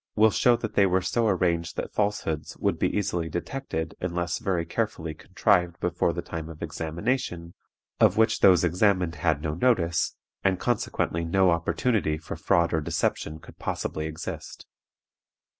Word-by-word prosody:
will 110 0 +5
show 120 +3 +4
that 110 -2 -5
they 100 -1 +4
were 95 0 +1
so 115 +3 +1
arranged 85 -4 +1
that - - -4
falsehoods 100 -7 -1
would - - 0
be - - +2
easily 85 -5 -1
detected 85 -3 -4
unless 85 0 -2
very 95 -7 -1
carefully 85 -4 -2
contrived 85 +2 +1
before 90 0 +1
the 85 +1 -4
time 80 -1 -6
of 80 -1 -8
examination, 85 0 -3 0.5
of - - +4
which 110 0 +3
those 90 -3 +6
examined 90 0 +2
had 80 -4 0
no 75 -2 -1
notice, 85 -4 +1 0.3
and 95 -1 +2
consequently 105 -7 -1
no 95 +2 +3
opportunity 85 0 +1
for 80 +1 -7
fraud 85 +1 +2
or 80 - +1
deception 80 +1 -1
could 80 - -15
possibly 80 0 -3
exist. 80 0 -7
85 Hz, 155 wpm, -26 LUFS, 80-100 Hz, 0.5 s, those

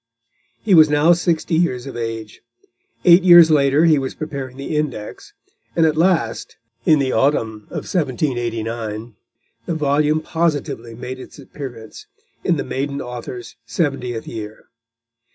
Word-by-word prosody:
He 210 - +2
was 155 -3 +7
now 150 +3 +4
sixty 170 -1 -1
years 160 -7 +1
of 135 - -8
age. 115 -2 -5 0.6
Eight 175 +1 +8
years 175 -3 +8
later 145 +1 +4
he 155 -3 +4
was 135 -1 -4
preparing 135 -4 -6
the 140 +3 -4
Index, 135 -9 -4 0.4
and 165 - +4
at 155 -1 +2
last, 160 -9 0 0.3
in 155 - +6
the 135 -2 0
autumn 110 -7 0
of - - -5
1789, 120 - -3 0.5
the 170 - -1
volume 150 +1 +1
positively 150 -8 -2
made 125 +2 -7
its - - -12
appearance, 125 -6 -10 0.4
in - - +1
the - - -2
maiden 140 +1 -3
author's 125 -1 -7
seventieth 125 -7 -2
year. 110 -1 -8
140 Hz, 135 wpm, -20 LUFS, 120-155 Hz, 0.6 s, Eight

